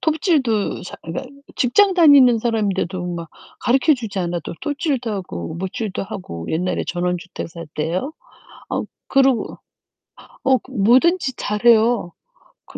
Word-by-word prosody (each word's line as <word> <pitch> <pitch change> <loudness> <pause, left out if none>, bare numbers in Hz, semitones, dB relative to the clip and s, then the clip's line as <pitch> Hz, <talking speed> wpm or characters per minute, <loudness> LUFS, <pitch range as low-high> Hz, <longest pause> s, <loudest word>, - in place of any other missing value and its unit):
톱질도 295 - +1
자 - - -8
그러니까 215 +12 -5 0.3
직장 380 +10 +4
다니는 280 -8 +7
사람인데도 200 -6 -1
막 170 -2 -6 0.3
가르쳐 270 +5 +3
주지 225 -6 -6
않아도 175 -2 -3
톱질도 280 -5 -2
하고 125 - -5
못질도 190 +4 -4
하고 180 - -7
옛날에 180 +3 -1
전원주택 180 0 -3
살 170 0 -9
때요. 175 - -2 0.6
어 - - -1 0.2
그러고 270 -3 +2 0.9
어 265 -1 +4
그 260 - -18
뭐든지 260 - +3
잘해요 220 -2 +2 0.5
그 - - -11
220 Hz, 280 characters per minute, -20 LUFS, 180-265 Hz, 0.9 s, 다니는